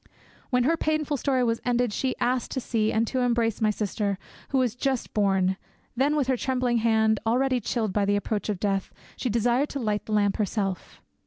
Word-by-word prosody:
When 250 Hz, -2 st, +2 dB
her 320 Hz, +6 st, +3 dB
painful 310 Hz, -2 st, 0 dB
story 260 Hz, -1 st, +1 dB
was 230 Hz, -1 st, 0 dB
ended 245 Hz, -2 st, +1 dB
she 260 Hz, +3 st, -1 dB
asked 250 Hz, -1 st, 0 dB
to 265 Hz, -, -1 dB
see 220 Hz, -3 st, 0 dB
and 225 Hz, +1 st, +2 dB
to 260 Hz, +3 st, -2 dB
embrace 235 Hz, -3 st, +1 dB
my 215 Hz, -, +3 dB
sister, 205 Hz, -1 st, -1 dB, 0.3 s
who 270 Hz, -, +1 dB
was 250 Hz, -4 st, +2 dB
just 265 Hz, 0 st, -2 dB
born; 190 Hz, -2 st, +2 dB, 0.4 s
then 280 Hz, +4 st, +2 dB
with 290 Hz, -3 st, +2 dB
her 260 Hz, 0 st, +1 dB
trembling 250 Hz, -1 st, 0 dB
hand, 220 Hz, -1 st, +3 dB
already 255 Hz, +3 st, +2 dB
chilled 220 Hz, -3 st, -2 dB
by 205 Hz, -1 st, +2 dB
the 205 Hz, 0 st, +2 dB
approach 205 Hz, +1 st, -2 dB
of 200 Hz, -4 st, -1 dB
death, 195 Hz, -1 st, -1 dB, 0.2 s
she 255 Hz, -, -2 dB
desired 240 Hz, +5 st, +1 dB
to 280 Hz, -, -4 dB
light 210 Hz, -4 st, -2 dB
the 215 Hz, -, -3 dB
lamp 205 Hz, -1 st, +2 dB
herself. 195 Hz, -2 st, -3 dB
230 Hz, 200 wpm, -26 LUFS, 210-255 Hz, 0.4 s, her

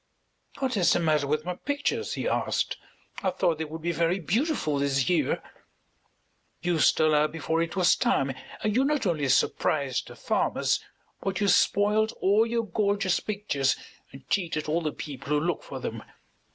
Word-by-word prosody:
"What 260 Hz, -3 st, -1 dB
is 180 Hz, -, +4 dB
the -, -, +2 dB
matter 155 Hz, -4 st, +1 dB
with 155 Hz, +2 st, -1 dB
my 180 Hz, -, -2 dB
pictures?" 285 Hz, +9 st, -2 dB
he -, -, -2 dB
asked. -, -, 0 dB, 0.5 s
"I 190 Hz, -, +1 dB
thought 170 Hz, -3 st, 0 dB
they 160 Hz, -, -1 dB
would 160 Hz, +1 st, -8 dB
be 170 Hz, -, 0 dB
very 170 Hz, +2 st, +1 dB
beautiful 195 Hz, -, 0 dB
this 140 Hz, -1 st, +1 dB
year." 160 Hz, -7 st, +1 dB, 1.2 s
"You 175 Hz, -2 st, +1 dB
stole 155 Hz, +1 st, +4 dB
out 150 Hz, 0 st, +3 dB
before 165 Hz, 0 st, -1 dB
it 165 Hz, +1 st, -2 dB
was 180 Hz, -3 st, +4 dB
time, 135 Hz, 0 st, +1 dB, 0.3 s
and 215 Hz, -1 st, 0 dB
you 260 Hz, -, +4 dB
not 290 Hz, -3 st, 0 dB
only 155 Hz, -7 st, 0 dB
surprised 135 Hz, 0 st, +1 dB
the -, -, -11 dB
farmers, -, -, 0 dB, 0.4 s
but 190 Hz, -1 st, -2 dB
you 205 Hz, -, +1 dB
spoiled 210 Hz, +3 st, +3 dB
all 210 Hz, +4 st, +3 dB
your 230 Hz, 0 st, -1 dB
gorgeous 200 Hz, -1 st, +1 dB
pictures 170 Hz, -11 st, 0 dB, 0.4 s
and 135 Hz, -1 st, -13 dB
cheated 165 Hz, -5 st, -1 dB
all 160 Hz, +3 st, +1 dB
the 155 Hz, -2 st, -1 dB
people 140 Hz, -2 st, -8 dB
who 150 Hz, 0 st, +3 dB
look 170 Hz, +3 st, -1 dB
for -, -, -7 dB
them. -, -, -5 dB
170 Hz, 175 wpm, -27 LUFS, 150-205 Hz, 1.2 s, is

